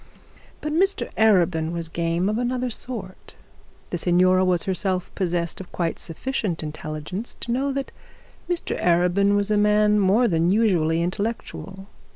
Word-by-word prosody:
But 300 0 -3
Mr 385 +5 +1
Arabin 175 -7 +3
was 170 -1 -3
game 170 +2 -1
of 215 +2 0
another 250 0 -1
sort. 220 -6 -7 0.6
The 175 - -2
signora 185 +2 +4
was 180 -2 +2
herself 185 -1 -1
possessed 175 -2 -2
of 185 - -12
quite 170 -2 -2
sufficient 180 -1 -3
intelligence 155 +7 -6
to 235 - -3
know 270 +3 0
that 275 0 -4 0.6
Mr 350 -1 -2
Arabin 180 +4 +3
was 205 +1 +1
a 210 - +3
man 210 0 +4
more 205 +5 +4
than 165 -3 +2
usually 175 -7 +2
intellectual. 195 0 -4
190 Hz, 145 wpm, -23 LUFS, 170-220 Hz, 0.6 s, signora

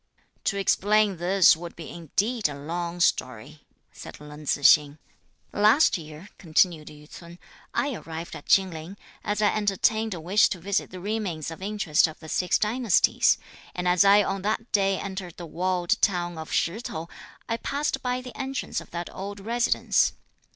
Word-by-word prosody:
"To 200 - 0
explain 205 +1 +2
this 180 +1 +5
would 170 +1 -9
be 165 - -9
indeed 200 - -1
a 145 - -6
long 170 +4 -5
story," 130 -1 -1 0.3
said - - -10
Leng 150 0 -11
Tzu 145 - 0
hsing. 145 +1 +5 0.6
"Last 215 +9 +4
year," 155 +2 -9
continued 165 -2 +1
Yü 150 0 -13
ts'un, 170 +1 -12 0.3
"I 285 -1 -1
arrived 165 -4 -7
at - - -11
Chin 190 -1 +4
Ling, 165 +5 -9 0.3
as 210 +1 -1
I 205 - +3
entertained 215 +1 +1
a - - -7
wish 185 +6 +3
to 185 - -4
visit 195 +3 -1
the 185 - -9
remains 185 -6 -3
of 165 - -10
interest 195 -7 +2
of 160 - -10
the 160 - -11
six 180 +3 +1
dynasties, 220 -2 +3 0.4
and 180 0 -2
as 180 +1 +4
I 200 +1 +6
on 195 0 -3
that 220 +3 -2
day 195 -2 +2
entered 190 -3 -6
the 175 - -7
walled 180 +4 -1
town 175 -3 +1
of 160 - -8
Shih 185 +7 0
T'ou, 165 -7 -6 0.4
I 230 - -1
passed 280 +2 -2
by 250 0 -2
the 250 -1 -10
entrance 270 0 -3
of - - -15
that 170 0 -6
old 200 +1 -7
residence. 235 +4 +1
185 Hz, 175 wpm, -26 LUFS, 165-210 Hz, 0.6 s, I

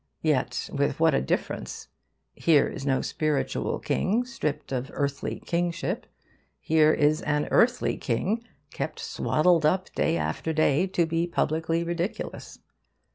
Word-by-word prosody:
Yet - - 0
with - - 0
what - - +4
a - - +2
difference! 65 - -3 0.5
Here 155 -4 +4
is 135 - -6
no 130 -1 +2
spiritual 155 -3 -1
king 230 +6 0
stripped 235 - -4
of 130 +1 -2
earthly 140 -1 -2
kingship. 175 +1 -2 0.5
Here 155 -1 +4
is 150 0 +2
an 150 0 0
earthly 245 +1 +3
king 195 - -1 0.3
kept - - -4
swaddled 165 +1 +2
up 185 +5 +1
day 85 - +1
after 80 - -2
day, 155 +3 +3
to 180 -2 +1
be 165 +1 0
publicly 165 0 0
ridiculous. 170 +4 -4
160 Hz, 130 wpm, -26 LUFS, 145-175 Hz, 0.5 s, what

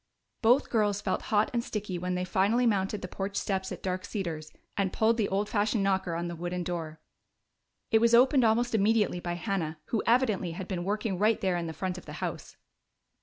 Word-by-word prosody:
Both 245 +5 +4
girls 210 -3 +2
felt - - -1
hot 210 0 +2
and 235 -1 0
sticky 205 -6 -4
when 180 +1 -2
they 180 0 -1
finally 205 +7 +2
mounted 200 -2 0
the - - -3
porch 195 +2 -4
steps 190 -1 -2
at - - -7
Dark 185 0 -2
Cedars 165 -8 -4 0.2
and 195 -2 0
pulled 225 +1 +2
the 215 -3 +1
old 200 +2 0
fashioned 210 0 +1
knocker 190 -3 0
on 170 +1 -2
the 170 - -5
wooden 175 +1 -3
door. 165 -3 -4 0.9
It 220 -1 +5
was 235 0 +5
opened 260 +2 +5
almost 235 +2 +2
immediately 210 -3 +2
by 175 0 -3
Hannah, 175 -4 -2
who 225 - +1
evidently 220 -8 +2
had 180 +2 -6
been 180 -3 -3
working 205 -1 -1
right 215 +1 +3
there 185 -2 0
in 170 -1 -2
the - - -4
front 185 +2 -3
of - - -18
the 150 - -7
house. - - -5
195 Hz, 210 wpm, -29 LUFS, 180-220 Hz, 0.9 s, It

